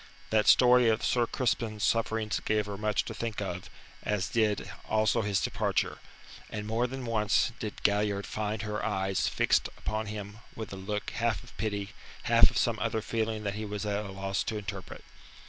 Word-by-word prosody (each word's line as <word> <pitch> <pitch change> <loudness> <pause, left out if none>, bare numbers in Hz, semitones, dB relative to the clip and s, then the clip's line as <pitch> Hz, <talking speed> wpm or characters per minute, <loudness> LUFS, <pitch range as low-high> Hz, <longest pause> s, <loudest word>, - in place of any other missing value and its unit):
That 110 -1 +3
story 125 -1 +7
of 110 +1 +1
Sir 120 -2 +2
Crispin's 115 -4 -1
sufferings 110 -1 +1
gave 105 -1 +1
her 100 -1 -5
much 105 +1 0
to - - -5
think 115 -2 -3
of, 90 -3 -4 0.3
as 100 -3 -1
did 110 -5 +1 0.2
also 110 +1 +3
his 100 -2 +1
departure, - - 0 0.5
and 105 -1 -4
more 115 +3 +1
than 130 0 -6
once 110 0 +2
did 105 -2 -5
Galliard 100 -1 +2
find 110 0 -3
her 105 0 -3
eyes 95 -3 0
fixed - - +2
upon 110 0 -2
him 105 0 -6 0.2
with 110 -3 -6
a - - -4
look 105 +2 -3
half 115 -2 0
of 120 - -15
pity, 100 -2 -2 0.3
half - - +6
of - - -4
some - - +1
other 110 - -1
feeling 110 -2 -1
that 100 -1 -1
he 110 +2 -4
was 105 0 -4
at 105 0 -1
a 100 - -7
loss 95 0 -2
to 110 - -2
interpret. 100 -2 -6
105 Hz, 185 wpm, -30 LUFS, 100-110 Hz, 0.5 s, story